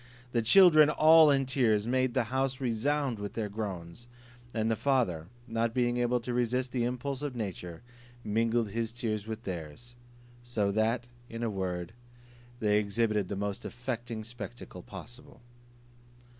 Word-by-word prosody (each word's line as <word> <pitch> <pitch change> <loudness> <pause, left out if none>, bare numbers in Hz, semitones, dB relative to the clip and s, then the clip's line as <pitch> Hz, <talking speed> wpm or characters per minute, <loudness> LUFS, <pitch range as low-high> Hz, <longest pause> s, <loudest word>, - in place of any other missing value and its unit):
The 120 - +1
children, 155 - +7
all 155 0 +7
in 135 -1 +3
tears, 115 -6 +2
made 130 +1 +1
the 130 - +3
house 130 -1 0
resound 130 +1 0
with 100 0 -5
their 110 -2 -3
groans; 100 0 -6 0.4
and 110 -1 0
the - - +2
father, 110 - 0 0.2
not 115 0 -1
being 120 -1 +1
able 120 0 +1
to 120 +1 -4
resist 125 +1 0
the 120 -2 0
impulse 125 +2 -3
of 145 -3 -4
nature, 95 -5 -5 0.4
mingled 115 0 +1
his 115 +1 -2
tears 110 -3 -3
with 110 +1 -5
theirs: 90 +6 -7 0.5
so 110 -5 0
that, 110 +3 +1 0.2
in 115 +1 -5
a 115 - 0
word, 90 -2 -3 0.7
they 105 -2 +3
exhibited 105 -1 0
the 100 - -4
most 100 0 -3
affecting 120 -2 -5
spectacle 115 -4 -8
possible. 115 +8 -11
115 Hz, 150 wpm, -30 LUFS, 105-125 Hz, 0.7 s, children